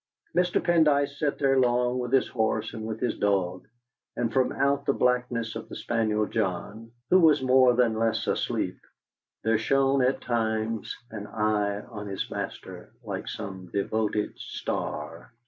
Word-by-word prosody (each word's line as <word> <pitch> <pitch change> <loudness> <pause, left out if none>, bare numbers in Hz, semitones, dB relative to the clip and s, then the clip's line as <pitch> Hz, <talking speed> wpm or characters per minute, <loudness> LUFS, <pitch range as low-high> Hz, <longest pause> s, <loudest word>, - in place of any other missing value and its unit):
Mr. 180 0 +3
Pendyce 145 -4 +2
sat 150 -3 0
there 135 -1 +3
long 125 0 +2
with 125 -1 -3
his 135 - +3
horse 110 -3 -1
and 110 -1 -5
with 110 0 -4
his 125 - -1
dog, 95 -3 0 0.5
and 115 -2 -1
from 130 +1 +2
out 140 +1 +1
the 140 - +4
blackness 125 -3 0
of - - -7
the - - -7
spaniel 110 -2 0
John, 105 +2 -3 0.2
who 185 - +7
was 155 -5 +5
more 130 -1 +5
than 120 -2 +3
less 115 0 0
asleep, - - -1 0.6
there 110 -1 +2
shone 135 +3 +2
at 130 +1 +2
times 110 -2 -1
an 105 -2 -6
eye 105 -1 0
turned - - -17
on 105 -2 -6
his 95 -1 -4
master - - -6
like - - -5
some 95 -4 -6
devoted 105 +2 -1
star. 80 +8 -5
115 Hz, 160 wpm, -27 LUFS, 105-130 Hz, 0.6 s, who